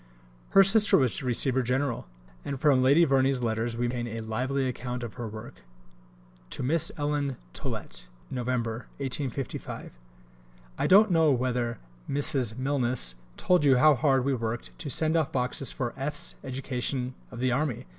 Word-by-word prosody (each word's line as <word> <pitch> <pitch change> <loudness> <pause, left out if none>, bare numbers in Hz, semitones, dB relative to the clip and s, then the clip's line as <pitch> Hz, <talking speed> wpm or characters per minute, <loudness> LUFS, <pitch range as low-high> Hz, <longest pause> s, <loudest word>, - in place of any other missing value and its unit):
Her 195 - +10
sister 205 +1 +6
was 130 +2 +1
receiver 130 +1 +2
general, 125 - -1 0.4
and 140 -2 -4
from 140 -3 +4
Lady 140 +6 +5
Verney's 135 -2 +2
letters 115 +1 -1
we 120 - 0
obtain 120 0 -2
a 115 0 -5
lively 130 +5 -1
account 125 -1 -4
of 115 - -6
the 120 -2 -5
work: 110 0 -9 0.9
(To - - -4
Miss 160 +5 +2
Ellen 145 -3 -1 0.2
Tollet.) - - -6 0.3
[Nov. 125 -2 -4
1855.] 125 +2 -4 0.9
I - - +1
don't 205 +2 +6
know 165 -2 +4
whether 125 -2 -1 0.3
Mrs. 135 -5 0
Milnes 130 - 0 0.2
told 180 -4 +2
you 135 -3 +5
how 150 +4 +6
hard 135 -1 +2
we 140 - +1
worked 115 -1 -4
to 150 - -4
send 155 +3 +1
off 160 -3 +1
boxes 125 +2 -2
for 120 -3 -3
F.'s 150 +5 -2
education 130 -1 -3 0.2
of 120 - -9
the 130 0 +1
army! 130 - -1
130 Hz, 155 wpm, -27 LUFS, 120-145 Hz, 0.9 s, Her